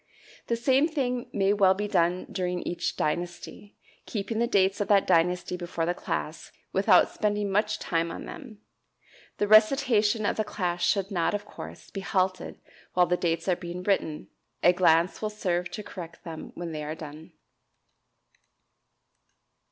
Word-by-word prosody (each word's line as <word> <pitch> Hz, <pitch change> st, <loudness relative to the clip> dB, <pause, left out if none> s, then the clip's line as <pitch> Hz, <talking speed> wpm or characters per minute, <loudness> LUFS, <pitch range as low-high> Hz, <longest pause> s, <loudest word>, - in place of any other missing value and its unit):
The 235 Hz, -, +1 dB
same 265 Hz, +5 st, +3 dB
thing 250 Hz, -6 st, -2 dB
may 195 Hz, 0 st, +2 dB
well 195 Hz, -2 st, +4 dB
be 210 Hz, +2 st, -2 dB
done 180 Hz, -2 st, +1 dB
during 180 Hz, -1 st, -2 dB
each 175 Hz, 0 st, -2 dB
dynasty, 175 Hz, +5 st, -4 dB, 0.3 s
keeping 220 Hz, +1 st, -3 dB
the 235 Hz, -, +2 dB
dates 195 Hz, -3 st, +2 dB
of 205 Hz, -, -1 dB
that 200 Hz, -1 st, +4 dB
dynasty 180 Hz, +2 st, +2 dB
before 175 Hz, -2 st, -3 dB
the 175 Hz, -, 0 dB
class -, -, -4 dB, 0.2 s
without -, -, +5 dB
spending 205 Hz, -1 st, -1 dB
much 210 Hz, +2 st, +1 dB
time 165 Hz, 0 st, -1 dB
on -, -, -7 dB
them. 230 Hz, -9 st, -10 dB, 0.8 s
The 205 Hz, -, 0 dB
recitation 215 Hz, -1 st, +4 dB
of -, -, 0 dB
the 215 Hz, -, +1 dB
class 180 Hz, -4 st, -3 dB
should 195 Hz, +3 st, +1 dB
not, 175 Hz, +1 st, +1 dB
of 205 Hz, 0 st, -4 dB
course, -, -, -10 dB
be 195 Hz, -, -5 dB
halted 185 Hz, -1 st, -1 dB, 0.4 s
while 180 Hz, 0 st, +5 dB
the 180 Hz, +1 st, +1 dB
dates 170 Hz, 0 st, -1 dB
are 185 Hz, -, +3 dB
being 175 Hz, 0 st, -7 dB
written; 160 Hz, -, -1 dB, 0.3 s
a 175 Hz, -, +6 dB
glance 170 Hz, 0 st, +3 dB
will 215 Hz, -, -1 dB
serve 180 Hz, -4 st, -2 dB
to 210 Hz, -, -6 dB
correct 170 Hz, -4 st, -9 dB
them 160 Hz, -2 st, -8 dB
when 175 Hz, -1 st, -5 dB
they 155 Hz, -1 st, -4 dB
are 155 Hz, +1 st, -4 dB
done. 155 Hz, +2 st, -10 dB
190 Hz, 160 wpm, -27 LUFS, 175-210 Hz, 0.8 s, a